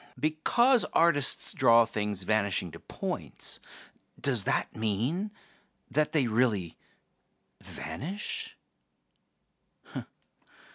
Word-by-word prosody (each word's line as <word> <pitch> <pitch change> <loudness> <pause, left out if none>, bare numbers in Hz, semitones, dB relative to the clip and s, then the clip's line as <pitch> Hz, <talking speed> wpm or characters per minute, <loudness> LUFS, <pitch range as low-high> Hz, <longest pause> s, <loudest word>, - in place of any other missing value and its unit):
Because 225 - +3
artists 155 -5 +3
draw 115 -4 +6
things 105 -4 -3
vanishing 100 -4 +1
to 85 - -10
points, - - -5 0.6
does 125 -8 +2
that - - 0
mean 115 - -1 0.6
that 155 0 +1
they 150 -5 +2
really 110 -7 +1 0.9
vanish?" 190 - -5
120 Hz, 80 wpm, -29 LUFS, 105-155 Hz, 0.9 s, draw